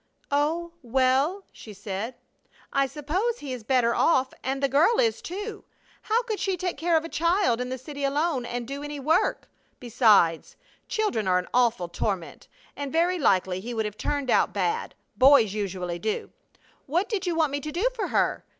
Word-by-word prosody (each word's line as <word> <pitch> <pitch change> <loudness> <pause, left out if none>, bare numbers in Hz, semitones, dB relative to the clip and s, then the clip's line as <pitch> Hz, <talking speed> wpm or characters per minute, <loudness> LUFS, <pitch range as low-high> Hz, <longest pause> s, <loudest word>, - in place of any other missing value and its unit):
"Oh, 320 +4 0
well," 265 - +1
she 215 - -12
said, 205 +4 -5 0.6
"I 275 0 +2
suppose 355 - -2
he 275 - -6
is 245 -3 -7
better 235 -1 +2
off, 260 -3 +2
and 270 +1 -1
the - - +5
girl 325 - +3
is, 460 -2 +1
too. 415 +4 -6 0.4
How 455 +3 +1
could 440 -4 -3
she 385 -2 -1
take 360 0 -2
care 330 +3 +2
of 320 - -2
a - - -4
child 335 - +1
in 250 - -3
the 260 - -3
city 285 +3 -8
alone, 285 0 0
and 240 0 -4
do 280 +2 -5
any 295 0 -6
work? 315 +6 +1 0.3
Besides, 215 - +3 0.3
children 245 - -1
are 180 -1 +3
an 180 - -2
awful 235 -7 +2
torment, 175 0 -4 0.3
and 285 -1 -5
very 345 +3 +2
likely 185 - +2
he 235 +5 -6
would 220 -1 0
have 210 -1 -4
turned 280 +2 -2
out - - +3
bad. 440 +2 -1 0.2
Boys 255 -6 +6
usually 185 -4 -3
do. 215 +2 -3 0.6
What 345 +8 0
did 395 -5 -2
you 345 - 0
want 315 -3 +2
me 285 - -1
to 300 +2 -6
do 360 +10 +1
for 470 - -3
her? - - 0
275 Hz, 185 wpm, -26 LUFS, 230-340 Hz, 0.6 s, Boys